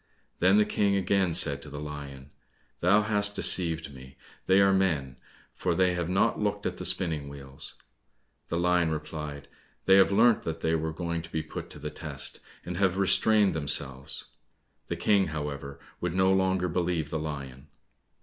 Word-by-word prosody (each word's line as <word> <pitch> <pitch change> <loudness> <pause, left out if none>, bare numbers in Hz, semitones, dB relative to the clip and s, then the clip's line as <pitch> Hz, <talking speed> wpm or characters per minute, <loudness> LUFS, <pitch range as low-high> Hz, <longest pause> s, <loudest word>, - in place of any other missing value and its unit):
Then 95 +3 +4
the 105 - +4
King 100 -1 0
again 95 -2 +1
said 75 -5 +2
to 75 - -10
the 70 0 -8
lion, 70 -2 -9 0.5
"Thou 100 +5 +3
hast 105 -1 +4
deceived 80 -5 +4
me, 65 0 -14 0.3
they 95 +1 +4
are 100 0 +4
men, 75 -9 0 0.4
for 90 -2 -2
they 90 +1 +2
have 85 -1 -3
not 95 +2 +1
looked 105 -1 -2
at - - -3
the - - -6
spinning 80 -6 +2
wheels." 70 -1 -9 0.7
The 85 - -3
lion 90 -1 +2
replied, 75 -2 -6 0.4
"They 95 0 +6
have 95 0 +5
learnt 115 +3 +4
that 80 - -5
they 80 - 0
were 80 0 -1
going 85 0 -4
to 85 +1 -13
be 80 0 -3
put - - -8
to - - -11
the - - -6
test, - - -4 0.3
and 85 0 -5
have 95 -1 +1
restrained 105 +1 +3
themselves." 70 -3 -1 0.6
The - - -3
King, 100 -2 +2
however, 75 -3 -6 0.2
would 90 0 -3
no 95 0 +3
longer 95 -1 +1
believe 85 -3 -2
the 80 - -2
lion. 70 -3 -7
85 Hz, 175 wpm, -27 LUFS, 75-95 Hz, 0.7 s, They